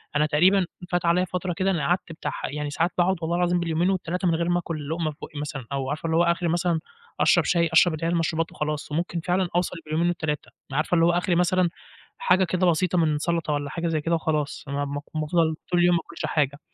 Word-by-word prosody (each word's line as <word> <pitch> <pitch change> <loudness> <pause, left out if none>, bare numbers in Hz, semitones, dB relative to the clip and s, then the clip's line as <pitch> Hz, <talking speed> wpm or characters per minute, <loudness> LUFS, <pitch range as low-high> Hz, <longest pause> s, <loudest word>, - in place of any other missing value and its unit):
أنا 150 +1 +3
تقريبًا 180 +6 +4 0.3
فات 175 -1 0
عليَّ 175 +2 +3
فترة 180 0 -3
كده 190 +2 0
أنا 165 -6 0
قعدت 175 -1 0
بتاع 165 - -4
ح - - -5
يعني 150 0 -3
ساعات 165 +5 0
باقعد 180 +2 +3
والله 165 +1 -1
العظيم 175 0 +2
باليومين 170 +1 +1
وال3 180 -1 -1
من 165 - +3
غير 170 +1 -1
ما 175 0 +2
آكل 155 -4 -5
لقمة 160 -1 -1
في 145 - -16
بُقّي 155 -2 -7
مثلًا، 145 -4 -5
أو 135 -1 -2
عارفة 150 +3 -4
اللي 165 0 +1
هو 170 - +5
آخري 170 0 +1
مثلًا 170 0 +1 0.4
أشرب - - +4
شاي، 170 -2 +2
أشرب 175 - +6
اللي 155 +1 -3
هي - - +1
المشروبات 165 -1 0
وخلاص، 150 0 -4
وممكن 170 +2 -1
فعلًا 180 +2 0
أوصل 175 0 0
باليومين 155 +3 0
وال3 155 -4 -2 0.2
عارفة 155 +5 +1
اللي 165 -1 +4
هو 170 - +4
آخري 175 +1 +1
مثلًا 180 0 +3 0.5
حاجة 335 - +3
كده 185 +1 +1
بسيطة 175 +2 +2
من 155 -3 +2
سلطة 165 -1 -1
والّا 145 -1 -2
حاجة 170 0 -3
زي 155 -2 0
كده 165 +2 +1
وخلاص، 155 -3 -2
أنا 140 +1 -2
م 140 0 -4 0.2
م 155 - 0
افضَل 160 0 +1 0.2
طول 175 - +3
اليوم 175 0 +5
ما 170 - +1
اكلش - - -5
حاجة، 145 -2 0
170 Hz, 240 wpm, -25 LUFS, 155-175 Hz, 0.5 s, أشرب